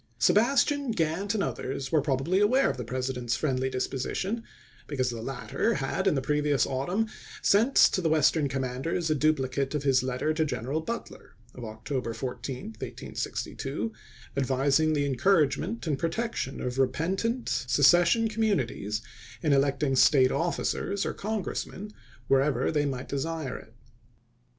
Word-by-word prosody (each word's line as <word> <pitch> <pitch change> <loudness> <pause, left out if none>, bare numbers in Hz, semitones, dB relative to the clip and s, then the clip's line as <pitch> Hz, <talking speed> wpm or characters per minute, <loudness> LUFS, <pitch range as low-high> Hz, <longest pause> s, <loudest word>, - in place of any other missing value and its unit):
Sebastian, 275 +4 +3
Gantt, 180 +5 -1
and 200 - +1
others 135 +1 -4
were 155 -2 +4
probably 145 +6 +1
aware 250 +7 +4
of - - -8
the 125 - -4
President's 125 0 -2
friendly 130 -3 0
disposition, 140 - -2 0.4
be 145 - -5
cause 130 -1 +1
the 115 -1 -6
latter 135 - -1
had 135 -3 -1
in - - +3
the 135 - -1
previous 150 -2 +2
autumn 175 +12 -1 0.4
sent 225 +7 +3
to 185 - +5
the 165 - +1
Western 155 -1 +3
commanders 135 +6 -2
a - - +5
duplicate 140 -2 0
of 145 - -1
his 135 -2 +3
letter 130 +4 -1
to 160 0 +1
General 145 +1 -2
Butler 235 +8 -7 0.2
(of 125 - -9
October 115 +2 -4
14, 125 +1 -5
1862), 150 +12 -4 0.4
advising 140 +3 +2
the 145 -1 +1
encouragement 150 - +1
and 145 -4 -1
protection 170 - -2
of 125 +1 -3
repentant 190 - 0
se 135 +3 0
cession 175 - +5
communities 140 - -1 0.4
in 150 -3 +3
electing 140 0 +2
State 130 0 +5
officers 185 +3 -1
or - - -2
Congressmen, 210 0 -4 0.4
wherever 135 +1 +2
they 145 -2 +1
might 130 -2 -4
desire 145 -1 -3
it. 110 - -12
145 Hz, 145 wpm, -28 LUFS, 130-175 Hz, 0.4 s, to